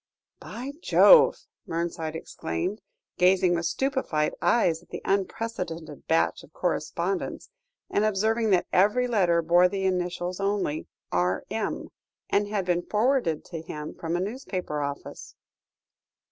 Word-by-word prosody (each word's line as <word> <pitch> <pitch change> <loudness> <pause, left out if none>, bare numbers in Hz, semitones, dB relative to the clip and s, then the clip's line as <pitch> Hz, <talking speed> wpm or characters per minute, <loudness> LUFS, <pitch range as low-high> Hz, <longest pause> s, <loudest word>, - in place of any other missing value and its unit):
"By 260 +4 -7
Jove!" - - +6 0.2
Mernside 165 -1 -3
exclaimed, 160 - -4 0.4
gazing 180 0 +4
with 170 -1 0
stupefied 260 - 0
eyes 170 -9 +2
at - - -23
the - - -7
unprecedented 185 -6 -3
batch 165 0 +2
of - - -17
correspondence, 175 +2 -2 0.4
and 205 - +1
observing 220 +2 +1
that 185 -3 +3
every 210 +7 +4
letter 180 -8 +2
bore 175 +2 +5
the 195 0 -2
initials 180 0 -1
only, 195 -6 -1 0.2
"R.M.," 95 - -1 0.4
and 205 0 +2
had 205 -3 -2
been 175 -1 +1
forwarded 210 - +1
to 165 -3 -6
him 150 -1 -7
from 165 0 -3
a - - 0
newspaper 190 - -4
office. 140 0 -6
180 Hz, 125 wpm, -26 LUFS, 165-210 Hz, 0.4 s, Jove